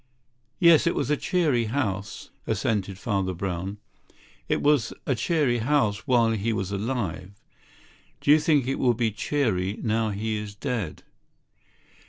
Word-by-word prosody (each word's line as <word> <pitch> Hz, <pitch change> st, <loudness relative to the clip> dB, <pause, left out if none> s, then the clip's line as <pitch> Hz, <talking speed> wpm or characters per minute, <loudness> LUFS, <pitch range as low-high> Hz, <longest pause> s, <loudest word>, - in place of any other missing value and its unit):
"Yes, 170 Hz, -3 st, +6 dB
it 170 Hz, -, +1 dB
was -, -, -1 dB
a -, -, +4 dB
cheery 150 Hz, -8 st, +1 dB
house," 110 Hz, -4 st, -3 dB, 0.2 s
assented 100 Hz, -3 st, -1 dB
Father 95 Hz, -3 st, -1 dB
Brown. 95 Hz, +2 st, -4 dB, 0.7 s
"It -, -, 0 dB
was 145 Hz, -5 st, +3 dB
a 135 Hz, -, +1 dB
cheery 125 Hz, 0 st, +1 dB
house 110 Hz, -6 st, +1 dB
while 120 Hz, -3 st, +4 dB
he 110 Hz, +1 st, -1 dB
was 95 Hz, -2 st, -3 dB
alive. 100 Hz, -4 st, -3 dB, 0.9 s
Do -, -, +2 dB
you 155 Hz, -, +7 dB
think 150 Hz, -4 st, +2 dB
it 135 Hz, +1 st, -2 dB
will 125 Hz, -2 st, +3 dB
be 115 Hz, -1 st, 0 dB
cheery 105 Hz, -4 st, -1 dB
now 110 Hz, 0 st, +1 dB
he 110 Hz, +2 st, -2 dB
is 105 Hz, -1 st, -6 dB
dead?" 110 Hz, -1 st, -4 dB
110 Hz, 145 wpm, -25 LUFS, 100-135 Hz, 0.9 s, you